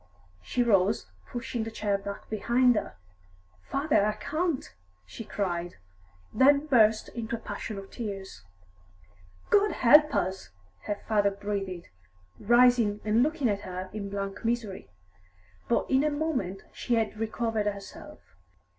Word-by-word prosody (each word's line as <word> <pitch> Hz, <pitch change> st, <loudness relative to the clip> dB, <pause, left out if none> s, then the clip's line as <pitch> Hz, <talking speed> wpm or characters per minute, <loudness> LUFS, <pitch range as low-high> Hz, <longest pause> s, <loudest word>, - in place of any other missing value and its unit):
She 245 Hz, -, 0 dB
rose, 195 Hz, -, +2 dB, 0.3 s
pushing 240 Hz, -1 st, -3 dB
the 225 Hz, -, -4 dB
chair 210 Hz, -2 st, -1 dB
back 200 Hz, 0 st, -6 dB
behind 240 Hz, +4 st, +3 dB
her. -, -, -3 dB, 0.7 s
"Father, 280 Hz, -6 st, +2 dB
I 210 Hz, +1 st, +1 dB
can't!" 310 Hz, +6 st, -2 dB, 0.4 s
she 160 Hz, -, -8 dB
cried; 175 Hz, -5 st, -3 dB, 0.6 s
then 280 Hz, +2 st, +5 dB
burst 220 Hz, -6 st, +4 dB
into 230 Hz, -1 st, -4 dB
a -, -, -7 dB
passion 210 Hz, 0 st, -6 dB
of 195 Hz, 0 st, -9 dB
tears. 195 Hz, -, -6 dB, 1.1 s
"God 415 Hz, 0 st, +4 dB
help 300 Hz, +3 st, +6 dB
us!" 190 Hz, -1 st, -2 dB, 0.4 s
her 205 Hz, -, -1 dB
father 205 Hz, -2 st, +3 dB
breathed, 195 Hz, -3 st, -4 dB, 0.5 s
rising 240 Hz, -2 st, +4 dB
and 215 Hz, +2 st, +3 dB
looking 295 Hz, -1 st, +1 dB
at 200 Hz, -2 st, 0 dB
her 185 Hz, -1 st, -6 dB
in 200 Hz, -2 st, -5 dB
blank 195 Hz, +1 st, -5 dB
misery. 225 Hz, -4 st, -2 dB, 0.8 s
But -, -, +2 dB
in 265 Hz, +1 st, +3 dB
a 305 Hz, -, +2 dB
moment 285 Hz, -, -2 dB
she 240 Hz, -, -1 dB
had 220 Hz, -1 st, -1 dB
recovered 225 Hz, -1 st, -1 dB
herself. 200 Hz, -1 st, -7 dB
215 Hz, 135 wpm, -28 LUFS, 200-245 Hz, 1.1 s, help